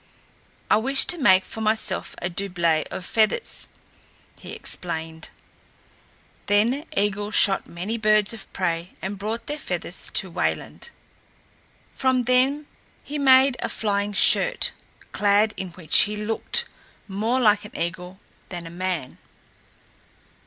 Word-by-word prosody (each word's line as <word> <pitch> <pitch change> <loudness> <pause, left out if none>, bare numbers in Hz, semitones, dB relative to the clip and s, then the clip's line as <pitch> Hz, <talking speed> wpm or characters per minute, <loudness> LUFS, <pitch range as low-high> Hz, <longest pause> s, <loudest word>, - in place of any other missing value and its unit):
"I - - +4
wish 265 +5 +2
to 350 - 0
make 190 -7 +5
for 220 - -7
myself 215 -3 -1
a - - +1
doublet 175 -4 0
of 185 - -6
feathers," 225 - 0 0.7
he - - -10
explained. 160 -2 -2 1.2
Then 235 +9 +2
Eigil 205 +1 0
shot 200 -2 +3
many 195 +7 -4
birds 215 -1 +3
of 225 - -11
prey 170 -1 -2
and 195 +1 -5
brought 225 +3 -4
their 295 +1 -4
feathers - - -4
to - - +2
Wayland. - - -3 1.0
From 260 -1 +1
them 260 +4 +2 0.4
he 295 +1 -5
made 265 -1 +5
a - - -3
flying 205 -1 -1
shirt, - - +3 0.4
clad 210 +1 +2
in 190 - -5
which 170 -4 +3
he 210 0 -5
looked 210 +1 +2 0.4
more 220 +6 -1
like 210 -4 +3
an 210 - -10
eagle 180 +2 -5 0.3
than 175 -2 -7
a 165 - -9
man. 175 -6 -4
205 Hz, 130 wpm, -23 LUFS, 185-235 Hz, 1.2 s, make